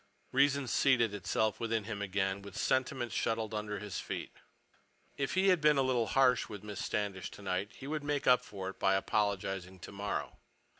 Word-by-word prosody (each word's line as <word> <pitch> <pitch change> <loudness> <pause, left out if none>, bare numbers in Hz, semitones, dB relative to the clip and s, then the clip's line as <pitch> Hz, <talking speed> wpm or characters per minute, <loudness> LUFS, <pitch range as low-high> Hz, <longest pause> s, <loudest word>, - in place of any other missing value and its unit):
Reason 140 0 +3
seated 120 -4 +3
itself 105 +2 0
within 115 -1 0
him 100 -1 -5
again, 95 0 -1
with 100 -1 -10
sentiment 130 -2 0
shuttled 110 -1 -1
under 105 -1 -3
his 105 -2 -5
feet. - - -5 0.8
If 140 +4 -2
he 190 +1 +4
had 180 -4 +4
been 150 -1 +5
a 135 - +4
little 125 -3 +1
harsh 130 -2 +3
with 105 -1 -8
Miss 105 -2 -5
Standish 100 -3 -2
tonight, 100 +2 -3
he 135 - -10
would 150 +1 -3
make 145 -1 -1
up 125 0 +5
for 95 -2 -6
it - - -20
by 95 0 +3
apologizing 95 -2 -1
tomorrow. 100 +3 -4
105 Hz, 180 wpm, -33 LUFS, 100-130 Hz, 0.8 s, been